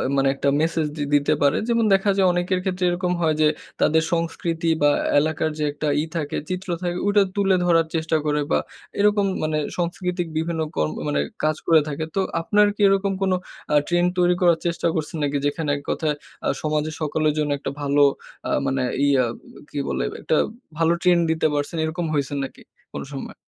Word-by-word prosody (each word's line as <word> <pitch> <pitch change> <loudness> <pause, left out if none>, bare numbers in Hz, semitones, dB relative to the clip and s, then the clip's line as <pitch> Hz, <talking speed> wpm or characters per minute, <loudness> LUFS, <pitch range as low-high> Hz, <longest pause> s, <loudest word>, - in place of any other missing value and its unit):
মানে 135 0 +3
একটা 140 +1 +1
ম্যাসেজ 160 0 +1
দি 150 - -1
দিতে 145 0 +3
পারে। 140 - +3
যেমন 230 -1 +2
দেখা 195 +1 +3
যায়, 190 -1 +4
অনেকের 175 +1 0
ক্ষেত্রে 185 -1 -2
এরকম 180 +1 -1
হয় 160 -2 +2
যে, 155 - +6 0.3
তাদের 160 +1 +4
সংস্কৃতি, 165 0 -1
বা 145 0 +5 0.3
এলাকার 155 +1 0
যে 155 - -2
একটা 150 +1 -4
ই - - -1
থাকে 150 -3 -2
চিত্র 185 +1 -4
থাকে, 175 -1 -2
ওইটা 205 0 +5
তুলে 195 -2 +3
ধরার 165 -2 +3
চেষ্টা 160 0 +1
করে, 150 0 +1
বা - - +4 0.4
এরকম 205 0 +3 0.2
মানে 155 0 0 0.2
সাংস্কৃতিক 175 0 -2
বিভিন্ন 160 0 -1
কর্ম 75 0 0 0.2
মানে 70 - +1 0.2
কাজ 155 0 +2
করে 160 -2 +6
থাকে। 150 +1 -3
তো 195 - +2 0.2
আপনার 210 +5 +4
কি 210 - -5
এরকম 195 0 +2
কোন 190 -1 +2 0.4
আ - - +4
ট্রেন্ড 175 +1 +2
তৈরি 180 0 +4
করার 170 -2 +4
চেষ্টা 170 0 0
করছেন 160 0 -3
নাকি? 145 0 0
যেখানে 145 +1 -1
১ - - -8
কথায় 155 -2 0 0.3
আ - - +2
সমাজের 155 0 -1
সকলের 155 0 +1
জন্য 150 -1 0
একটা 135 - -4
ভালো, 145 0 +3 0.4
আ - - -3 0.2
মানে 135 -1 0 0.2
ইয়া 135 -3 +3 0.4
কি 145 - -4
বলে? - - -1 0.2
একটা 155 - +1 0.4
ভালো 165 0 +3
ট্রেন্ড 175 -2 +4
দিতে 160 -1 +2
পারছেন, 145 +3 -2
এরকম 165 +2 -3
হইছেন 140 0 -1
নাকি 135 - -8 0.3
কোন - - -4
সময়? 135 - -6
160 Hz, 190 wpm, -23 LUFS, 150-180 Hz, 0.4 s, যে